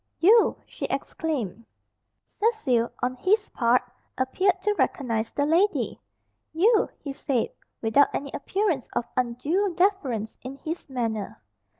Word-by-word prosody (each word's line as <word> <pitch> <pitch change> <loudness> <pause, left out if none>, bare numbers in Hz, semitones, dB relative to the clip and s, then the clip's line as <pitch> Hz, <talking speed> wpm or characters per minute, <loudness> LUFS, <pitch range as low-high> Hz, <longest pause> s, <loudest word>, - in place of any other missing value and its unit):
"You!" 435 +6 +5
she - - -6
exclaimed. 235 - -3 0.6
Cecil, 350 - +1
on 250 - +1
his 415 - +2
part, 240 0 +2 0.3
appeared 355 +9 +1
to 420 - +2
recognise 230 - 0
the 285 - 0
lady. 355 +7 +1 0.5
"You!" 420 +7 +4
he 280 -3 -6
said 270 -4 -1 0.3
without 225 +6 +5
any 280 -1 -4
appearance 365 - -1
of 235 - 0
undue 285 +11 0
deference 280 - 0
in 260 +2 -7
his 315 +3 -6
manner. 225 - -3
280 Hz, 120 wpm, -26 LUFS, 240-380 Hz, 0.6 s, You